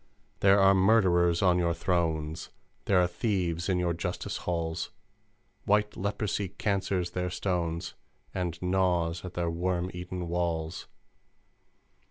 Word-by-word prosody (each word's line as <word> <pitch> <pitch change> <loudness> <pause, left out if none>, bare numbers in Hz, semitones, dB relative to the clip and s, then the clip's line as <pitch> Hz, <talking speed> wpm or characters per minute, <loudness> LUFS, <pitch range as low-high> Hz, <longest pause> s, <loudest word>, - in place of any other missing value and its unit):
"There 100 +1 +5
are 95 0 +6
murderers 95 -4 +4
on 90 -1 +4
your 85 -1 +1
thrones, 80 -3 -1 0.4
There 95 -2 +4
are 90 - +4
thieves 90 -2 -1
in 95 - +2
your 90 -1 +1
Justice 85 +2 -3
halls! 85 -2 -2 0.8
White 105 +1 +2
Leprosy 100 0 -2
cancers 95 -2 -1
their 90 0 -2
stones, 85 -2 -2 0.4
And 90 -3 -3
gnaws 90 -2 +1
at 90 -1 -8
their 85 -1 0
worm 90 +1 -1
eaten 90 0 -5
walls! 85 -1 -2
90 Hz, 125 wpm, -29 LUFS, 85-95 Hz, 0.8 s, are